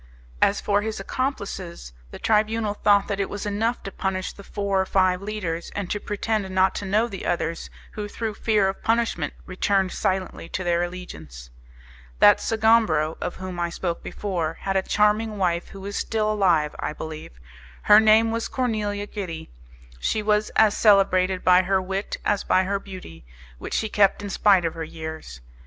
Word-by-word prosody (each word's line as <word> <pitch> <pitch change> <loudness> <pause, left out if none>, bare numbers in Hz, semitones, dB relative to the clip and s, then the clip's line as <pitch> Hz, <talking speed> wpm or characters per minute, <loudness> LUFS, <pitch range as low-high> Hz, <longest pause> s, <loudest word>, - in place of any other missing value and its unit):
As 200 - +3
for 205 0 +1
his 220 -1 -4
accomplices, 195 - -4 0.2
the - - -9
Tribunal 215 0 +1
thought 205 -1 +3
that 200 -1 -3
it 195 - -1
was 205 +1 -5
enough 220 +4 -1
to 195 - -6
punish 190 -1 -3
the 200 - -13
four 200 -1 -1
or - - -1
five 185 -1 +2
leaders, 190 -5 -4
and 200 -3 -3
to 210 - -1
pretend 205 -1 -2
not 190 0 +2
to - - -6
know 215 +4 +2
the 195 -5 -7
others, 170 -1 -2 0.2
who 210 -1 -5
through 220 +1 -4
fear 210 -2 +2
of 190 - -4
punishment 225 -9 0
returned 190 0 0
silently 185 -3 -2
to 185 - -3
their 175 -1 +1
allegiance. 80 - -7 0.7
That - - +6
Sgombro, 220 -9 +2
of - - -3
whom 185 -1 -6
I 170 0 0
spoke 170 0 -3
before, 170 -6 -3
had 195 0 -2
a 190 - +3
charming 210 +2 +1
wife 175 -3 0
who 195 0 -10
is 200 0 -4
still 215 -1 0
alive, 175 -8 +2
I - - -3
believe. 155 - -8 0.5
Her 210 0 +8
name 220 +1 +5
was 230 0 -2
Cornelia 210 -5 -2
Gitti; 180 -7 -6 0.5
she 215 - -1
was 210 0 +2
as 215 -2 +5
celebrated 190 -3 +3
by 180 0 +6
her 190 +1 +1
wit 190 +2 -3
as 205 -2 +1
by 185 - +3
her 200 +1 -1
beauty, 185 - -11 0.4
which - - -5
she 220 - 0
kept 205 -1 +2
in 200 - -5
spite 195 -4 +4
of 165 - -1
her 165 - -5
years. 160 - -8
195 Hz, 180 wpm, -24 LUFS, 180-210 Hz, 0.7 s, Her